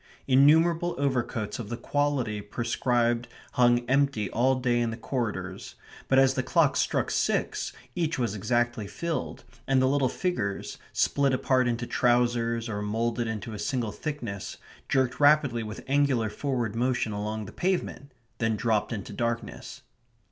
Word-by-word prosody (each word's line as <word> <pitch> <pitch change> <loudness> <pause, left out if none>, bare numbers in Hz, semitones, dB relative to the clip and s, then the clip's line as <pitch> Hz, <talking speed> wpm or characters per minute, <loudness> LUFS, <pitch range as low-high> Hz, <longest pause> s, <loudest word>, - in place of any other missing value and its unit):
Innumerable 160 +6 +4
overcoats 125 -6 -1
of 110 -4 -6
the 120 - -3
quality 130 -6 -1
prescribed 120 +2 0 0.2
hung 120 -1 +3
empty 135 -6 +1
all 130 +3 +3
day 125 -2 +1
in 120 -1 +1
the 115 - -5
corridors, 105 -6 -4 0.3
but 130 - +3
as 135 0 +5
the - - 0
clock - - +2
struck - - 0
six - - 0 0.2
each 165 0 -1
was 120 -6 -1
exactly 120 +1 0
filled, 170 - -4 0.2
and 135 -1 +3
the 130 - +3
little 135 -1 +2
figures, 115 - -3
split 140 -2 +2
apart 130 -1 +2
into 120 0 -1
trousers 120 -1 +1
or 105 -2 -3
moulded 115 +3 -1
into 110 0 -4
a 105 - -6
single 115 0 -1
thickness, 120 -11 -5 0.3
jerked 130 -2 +1
rapidly 145 -5 +4
with 110 -1 -7
angular 135 -6 +2
forward 125 -6 -2
motion 120 -2 0
along 105 +1 -3
the - - -9
pavement; 175 -6 -2 0.3
then 115 -1 +1
dropped 110 0 0
into 105 -5 -5
darkness. 115 0 -4
120 Hz, 150 wpm, -27 LUFS, 110-135 Hz, 0.3 s, as